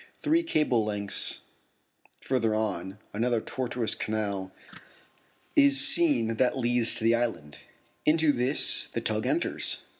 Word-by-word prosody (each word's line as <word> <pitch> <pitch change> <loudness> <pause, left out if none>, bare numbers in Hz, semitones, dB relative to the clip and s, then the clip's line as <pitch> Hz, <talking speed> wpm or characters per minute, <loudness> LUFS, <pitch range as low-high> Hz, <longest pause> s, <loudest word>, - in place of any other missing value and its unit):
Three 320 +2 +3
cable's 150 - 0
lengths 100 -1 -1 0.8
further 115 -5 0
on, 95 -3 -3 0.2
another 115 +2 0
tortuous 120 -2 -2
canal 100 -3 -3 1.0
is 140 -1 +5
seen 125 -10 +3
that 130 +2 +1
leads 120 -2 0
to - - -2
the 115 +1 +4
island. 115 -12 -3 0.4
Into 155 0 +3
this 125 +3 0
the - - -2
tug - - -1
enters. - - -1
115 Hz, 120 wpm, -27 LUFS, 110-130 Hz, 1.0 s, is